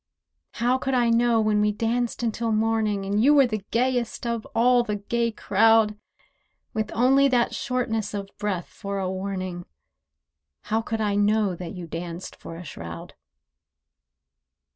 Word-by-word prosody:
How 250 Hz, +2 st, +1 dB
could 265 Hz, 0 st, -1 dB
I 240 Hz, -2 st, +3 dB
know 235 Hz, 0 st, +3 dB
when 215 Hz, -1 st, +2 dB
we 210 Hz, 0 st, +3 dB
danced 235 Hz, +3 st, -1 dB
until 230 Hz, 0 st, -1 dB
morning, 215 Hz, -2 st, +1 dB
And 205 Hz, +3 st, +1 dB
you 290 Hz, +3 st, +6 dB
were 275 Hz, -2 st, +7 dB
the 215 Hz, -4 st, -3 dB
gayest 245 Hz, 0 st, 0 dB
of 235 Hz, -2 st, -2 dB
all 245 Hz, +2 st, +5 dB
the 210 Hz, -3 st, -2 dB
gay 235 Hz, +3 st, -1 dB
crowd— 220 Hz, +1 st, +3 dB, 0.8 s
With 215 Hz, -1 st, -2 dB
only 270 Hz, +4 st, +5 dB
that 245 Hz, -3 st, +2 dB
shortness 230 Hz, -5 st, -2 dB
of 200 Hz, -1 st, -4 dB
breath 200 Hz, -4 st, -2 dB
for 200 Hz, -1 st, -5 dB
a 190 Hz, -1 st, -1 dB
warning, 185 Hz, -2 st, -4 dB, 0.9 s
How 220 Hz, +1 st, -1 dB
could 225 Hz, 0 st, -3 dB
I 205 Hz, -1 st, +1 dB
know 205 Hz, -1 st, +2 dB
that 175 Hz, +1 st, -7 dB
you 180 Hz, -1 st, -6 dB
danced 170 Hz, +2 st, -6 dB
for 165 Hz, -, -10 dB
a 170 Hz, -, -8 dB
shroud? 85 Hz, -, -8 dB
220 Hz, 155 wpm, -25 LUFS, 200-235 Hz, 0.9 s, were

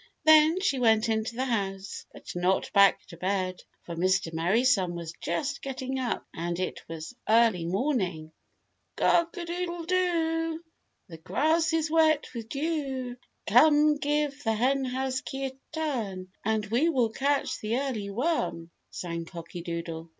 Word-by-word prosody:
Then 315 Hz, +2 st, +7 dB
she 280 Hz, -9 st, +1 dB
went 225 Hz, -1 st, +3 dB
into 220 Hz, +1 st, -1 dB
the 260 Hz, +2 st, -1 dB
house, 195 Hz, -5 st, -3 dB
but -, -, -14 dB
not 180 Hz, +2 st, 0 dB
back 200 Hz, -1 st, +5 dB
to 170 Hz, -, -10 dB
bed, 185 Hz, 0 st, -1 dB, 0.2 s
for 170 Hz, -, -6 dB
Mr. 185 Hz, -1 st, +1 dB
Merry 175 Hz, +9 st, +2 dB
Sun 190 Hz, -9 st, +2 dB
was 170 Hz, -1 st, -6 dB
just 170 Hz, -, -2 dB
getting 265 Hz, 0 st, -4 dB
up 245 Hz, -3 st, -2 dB
and 170 Hz, +1 st, -3 dB
it 185 Hz, -, -3 dB
was 165 Hz, +7 st, -7 dB
early 220 Hz, -6 st, +4 dB
morning. 185 Hz, -, -1 dB, 0.6 s
"Cock 340 Hz, +2 st, +2 dB
a 345 Hz, -, -4 dB
doodle 345 Hz, 0 st, -3 dB
do, 330 Hz, -2 st, 0 dB, 0.4 s
The 165 Hz, -, -10 dB
grass 320 Hz, -, +1 dB
is 320 Hz, -1 st, 0 dB
wet 315 Hz, -2 st, +4 dB
with 230 Hz, -2 st, -7 dB
dew. 275 Hz, -5 st, -2 dB, 0.3 s
Come, 295 Hz, +6 st, +5 dB
give 290 Hz, 0 st, -1 dB
the 225 Hz, -, +1 dB
Henhouse 260 Hz, +2 st, 0 dB
key 270 Hz, 0 st, -4 dB
a 265 Hz, -, -3 dB, 0.2 s
turn 230 Hz, -, -3 dB
And 220 Hz, 0 st, 0 dB
we 240 Hz, +10 st, +2 dB
will 250 Hz, -8 st, +2 dB
catch 280 Hz, +4 st, 0 dB
the 220 Hz, +3 st, -1 dB
early 250 Hz, -7 st, -2 dB
worm," 205 Hz, -, -1 dB, 0.2 s
sang 170 Hz, -1 st, -5 dB
Cocky 170 Hz, +1 st, -8 dB
Doodle. 170 Hz, -1 st, -5 dB
240 Hz, 150 wpm, -28 LUFS, 185-300 Hz, 0.6 s, Then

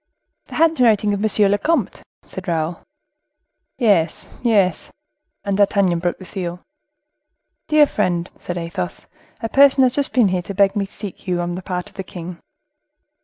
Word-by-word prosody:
"The -, -, -9 dB
handwriting 245 Hz, -10 st, +3 dB
of 200 Hz, -, -2 dB
monsieur 210 Hz, -1 st, +3 dB
le 205 Hz, +1 st, +2 dB
comte," 330 Hz, +9 st, 0 dB, 0.2 s
said -, -, -8 dB
Raoul. 165 Hz, 0 st, -2 dB, 1.0 s
"Yes, 200 Hz, -, +1 dB
yes." 200 Hz, -8 st, +2 dB, 0.5 s
And 200 Hz, -1 st, -1 dB
D'Artagnan 200 Hz, -4 st, +3 dB
broke 175 Hz, 0 st, -1 dB
the 185 Hz, -, -11 dB
seal. 180 Hz, -2 st, -5 dB, 1.0 s
"Dear 305 Hz, -1 st, +6 dB
friend," 180 Hz, -8 st, -1 dB
said 175 Hz, -, -5 dB
Athos, 170 Hz, +1 st, -5 dB, 0.4 s
"a 225 Hz, -, -1 dB
person 275 Hz, +1 st, +5 dB
has 250 Hz, -1 st, +3 dB
just 285 Hz, 0 st, -1 dB
been 240 Hz, -6 st, +3 dB
here 180 Hz, -1 st, 0 dB
to 195 Hz, +3 st, -7 dB
beg 200 Hz, +1 st, +3 dB
me 200 Hz, -2 st, -1 dB
to -, -, -23 dB
seek 205 Hz, -4 st, -8 dB
for -, -, -9 dB
you, 175 Hz, -1 st, 0 dB
on 175 Hz, 0 st, -2 dB
the 180 Hz, -, -5 dB
part 180 Hz, -1 st, -4 dB
of 195 Hz, -, -18 dB
the 190 Hz, -, -3 dB
king." 175 Hz, -1 st, -8 dB
195 Hz, 170 wpm, -20 LUFS, 175-220 Hz, 1.0 s, Dear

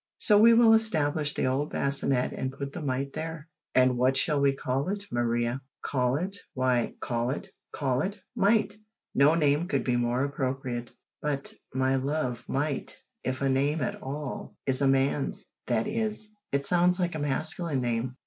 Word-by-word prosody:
So 210 Hz, -, +4 dB
we 230 Hz, +2 st, +7 dB
will 230 Hz, -1 st, +7 dB
establish 155 Hz, -9 st, +2 dB
the -, -, 0 dB
old 135 Hz, +3 st, 0 dB
bassinet 140 Hz, -2 st, 0 dB
and 130 Hz, -, -3 dB
put 140 Hz, +1 st, -6 dB
the 175 Hz, -, -5 dB
mite 135 Hz, -1 st, -2 dB
there." 160 Hz, -1 st, -5 dB, 0.3 s
"And 130 Hz, -1 st, +4 dB
what 130 Hz, +1 st, +3 dB
shall 150 Hz, -3 st, +2 dB
we 140 Hz, 0 st, +4 dB
call 135 Hz, +5 st, -1 dB
it, 200 Hz, 0 st, -2 dB
Maria?" 120 Hz, +1 st, 0 dB, 0.2 s
"Call 125 Hz, -2 st, +1 dB
it 190 Hz, +6 st, -2 dB, 0.2 s
why, 130 Hz, -2 st, +1 dB
call 120 Hz, 0 st, -1 dB
it 135 Hz, -, -4 dB, 0.2 s
call 130 Hz, -3 st, 0 dB
it 200 Hz, +2 st, -3 dB, 0.2 s
Mite 215 Hz, 0 st, +2 dB, 0.4 s
no 145 Hz, +4 st, +5 dB
name 150 Hz, +1 st, +2 dB
could -, -, 0 dB
be 125 Hz, -, +1 dB
more 120 Hz, +2 st, +1 dB
appropriate." 130 Hz, -3 st, -3 dB, 0.3 s
"But, 145 Hz, -2 st, -2 dB, 0.2 s
my 130 Hz, 0 st, +2 dB
love, 130 Hz, -3 st, -2 dB
Mite, 145 Hz, +1 st, -2 dB, 0.3 s
if 130 Hz, +1 st, -2 dB
a 135 Hz, -, +2 dB
name 140 Hz, +4 st, +1 dB
at 125 Hz, -, -3 dB
all, 140 Hz, +1 st, -5 dB
is 135 Hz, 0 st, +2 dB
a 140 Hz, -, +4 dB
man's 135 Hz, +1 st, +1 dB, 0.2 s
that 115 Hz, -2 st, +1 dB
is, 215 Hz, -1 st, -2 dB, 0.2 s
it 140 Hz, 0 st, 0 dB
sounds 180 Hz, +1 st, +3 dB
like 175 Hz, -1 st, 0 dB
a 155 Hz, -, -4 dB
masculine 150 Hz, +1 st, 0 dB
name." 120 Hz, +1 st, -1 dB
140 Hz, 175 wpm, -28 LUFS, 130-160 Hz, 0.4 s, we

